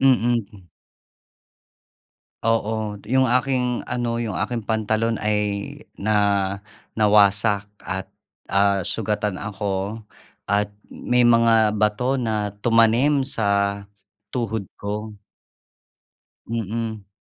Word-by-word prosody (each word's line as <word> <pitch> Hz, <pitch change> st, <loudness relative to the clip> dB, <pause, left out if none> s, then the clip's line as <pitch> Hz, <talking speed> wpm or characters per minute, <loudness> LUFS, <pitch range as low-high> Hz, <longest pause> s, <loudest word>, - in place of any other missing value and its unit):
Mhm. 115 Hz, -7 st, +1 dB, 1.8 s
Oo, 110 Hz, -2 st, 0 dB
yung 130 Hz, +1 st, +4 dB
aking 125 Hz, 0 st, +1 dB
ano 120 Hz, -1 st, -1 dB
yung 110 Hz, -7 st, -3 dB
aking 115 Hz, +6 st, -2 dB
pantalon 110 Hz, +1 st, 0 dB
ay 105 Hz, 0 st, 0 dB, 0.6 s
na 110 Hz, +2 st, -1 dB, 0.8 s
nawasak 105 Hz, -1 st, +3 dB, 0.2 s
at, 95 Hz, 0 st, -5 dB, 0.4 s
ah, 100 Hz, -2 st, +3 dB
sugatan 105 Hz, -2 st, -2 dB
ako 100 Hz, +1 st, -3 dB, 0.4 s
at 100 Hz, +1 st, +1 dB, 0.2 s
may 125 Hz, 0 st, +1 dB
mga 115 Hz, -2 st, +5 dB
bato 125 Hz, +5 st, +1 dB
na 105 Hz, -3 st, -1 dB
tumanim 120 Hz, +5 st, +4 dB
sa 100 Hz, -4 st, 0 dB, 0.5 s
tuhod 110 Hz, -5 st, -3 dB
ko. 105 Hz, +1 st, -5 dB, 1.3 s
Mm. 110 Hz, -2 st, -3 dB
110 Hz, 85 wpm, -23 LUFS, 100-115 Hz, 1.8 s, mga